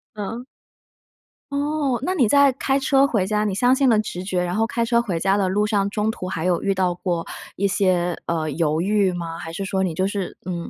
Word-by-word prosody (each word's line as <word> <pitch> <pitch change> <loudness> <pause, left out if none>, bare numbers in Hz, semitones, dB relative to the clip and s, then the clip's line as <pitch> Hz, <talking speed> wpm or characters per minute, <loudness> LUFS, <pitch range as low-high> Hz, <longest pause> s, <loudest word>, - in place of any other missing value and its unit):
嗯？ 220 +4 -5 1.1
哦， 285 -2 0
那 365 +6 -1
你 260 - +3
在 280 +2 +5
开 270 +1 0
车 275 0 +3
回 220 -9 +1
家 210 +1 0
你 210 - -1
相 245 +4 +4
信 265 0 +2
了 225 -3 +4
直 210 -4 -3
觉， 185 -1 -1
然 175 0 -2
后 220 +2 +2
开 235 0 -1
车 235 0 +2
回 190 -8 -2
家 195 +3 +2
的 195 -2 +1
路 205 +3 +1
上 200 -2 0
中 210 +1 -1
途 185 -4 -4
还 165 -3 -3
有 180 -1 +1
遇 200 - +1
到 185 -2 0
过 175 -2 -3 0.3
一 200 - +1
些， 185 -3 +1
呃， 160 -2 -1
犹 155 +1 0
豫 200 0 +2
吗？ 170 -2 -5
还 165 -1 -7
是 195 +4 -4
说 190 0 -1
你 185 -3 0
就 185 +4 0
是 195 -2 -4
嗯， 175 -2 -4
195 Hz, 245 characters per minute, -22 LUFS, 180-235 Hz, 1.1 s, 在